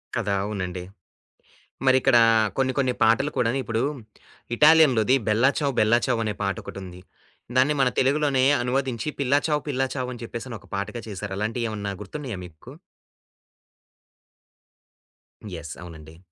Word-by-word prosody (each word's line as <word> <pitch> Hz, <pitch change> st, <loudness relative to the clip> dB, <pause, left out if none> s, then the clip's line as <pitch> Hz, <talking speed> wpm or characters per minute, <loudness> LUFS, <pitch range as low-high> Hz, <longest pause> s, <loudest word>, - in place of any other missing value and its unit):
కదా! 105 Hz, -4 st, -1 dB
అవునండి. 90 Hz, -3 st, -4 dB, 1.0 s
మరిక్కడా 130 Hz, -2 st, +5 dB, 0.4 s
కొన్ని 130 Hz, -1 st, +1 dB
కొన్ని 130 Hz, -2 st, +1 dB
పాటలు 115 Hz, +7 st, +3 dB
కూడాను 120 Hz, +2 st, +1 dB
ఇప్పుడు, 115 Hz, +1 st, -1 dB, 0.7 s
ఇటాలియన్‌లోది, 140 Hz, -6 st, +5 dB
'బెల్లా 115 Hz, +5 st, +4 dB
చావ్ 140 Hz, -3 st, 0 dB
బెల్లా 115 Hz, +3 st, +4 dB
చావ్' 120 Hz, -3 st, 0 dB
అనే 105 Hz, -1 st, -2 dB
పాటొకటుంది. 95 Hz, -2 st, -5 dB, 0.6 s
దాన్ని 135 Hz, +4 st, +4 dB
మన 130 Hz, -, +4 dB
తెలుగులోనే 135 Hz, -1 st, +2 dB, 0.2 s
అనువదించి 130 Hz, +1 st, -1 dB
'పిల్ల 140 Hz, 0 st, 0 dB
చావ్ 150 Hz, -1 st, +1 dB
పిల్ల 135 Hz, -2 st, -1 dB
చావ్' 125 Hz, -1 st, -3 dB
అని 120 Hz, -, -10 dB
చెప్పేసని 115 Hz, 0 st, -7 dB
ఒక -, -, -20 dB
పాటగా 100 Hz, +4 st, -4 dB
చేసారు. 100 Hz, 0 st, -5 dB
అలాంటియ్యి 115 Hz, +3 st, -2 dB
ఏవన్నా 105 Hz, -2 st, -4 dB
గుర్తున్నాయా 120 Hz, +1 st, -6 dB
మీకు? 80 Hz, -3 st, -14 dB, 2.8 s
యెస్. 80 Hz, -2 st, -7 dB
అవునండి. 80 Hz, -2 st, -12 dB
120 Hz, 125 wpm, -24 LUFS, 105-135 Hz, 2.8 s, మరిక్కడా